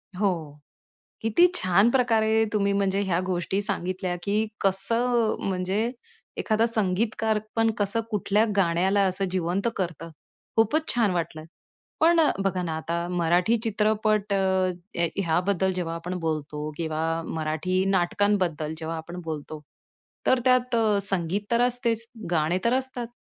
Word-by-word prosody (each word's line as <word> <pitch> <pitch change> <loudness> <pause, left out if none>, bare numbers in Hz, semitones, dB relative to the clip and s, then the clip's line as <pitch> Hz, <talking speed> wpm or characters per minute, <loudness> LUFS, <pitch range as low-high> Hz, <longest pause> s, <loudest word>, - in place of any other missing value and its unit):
हो. 170 -7 -2 0.6
किती 225 +11 +4
छान 195 - +4
प्रकारे 225 -3 +3
तुम्ही 200 -1 +2
म्हणजे 200 0 +1
ह्या 185 -4 0
गोष्टी 185 +2 -1
सांगितल्या 185 -2 -2
की 210 +2 0
कसं 230 +4 +1
म्हणजे 195 +5 -1 0.5
एखादा 220 0 +2
संगीतकार 220 0 0 0.2
पण 225 0 +3
कसं 205 +2 0
कुठल्या 210 0 +2
गाण्याला 190 +1 +2
असं 190 +1 0
जिवंत 185 +3 -1
करतं. 165 -3 -4 0.5
खूपच 260 +9 +2
छान 225 -5 +2
वाटलंय. 160 -3 -3 0.5
पण 335 +1 +5
अ, 310 - +4
बघा 185 -2 0
ना 165 -2 -2
आता 170 +2 -3
मराठी 180 +5 +2
चित्रपट 215 -1 +1
अ, 195 - +2 0.6
ह 170 - +3 0.2
ह्याबद्दल 185 +3 +1
जेव्हा 170 -2 -3
आपण 180 +2 -4
बोलतो 155 -2 -3
किंवा 160 -2 -3 0.3
मराठी 160 +4 -1
नाटकांबद्दल 180 -4 +1
जेव्हा 165 +1 -4
आपण 170 +3 -7
बोलतो, 155 -1 -6 0.7
तर 260 - +4
त्यात 250 -1 +3 0.3
संगीत 195 -1 -1
तर 235 0 +3
असतेच. 235 -2 +1 0.2
गाणे 160 +2 +2
तर 235 - +3
असतात. 260 -2 -2
195 Hz, 130 wpm, -26 LUFS, 170-220 Hz, 0.7 s, पण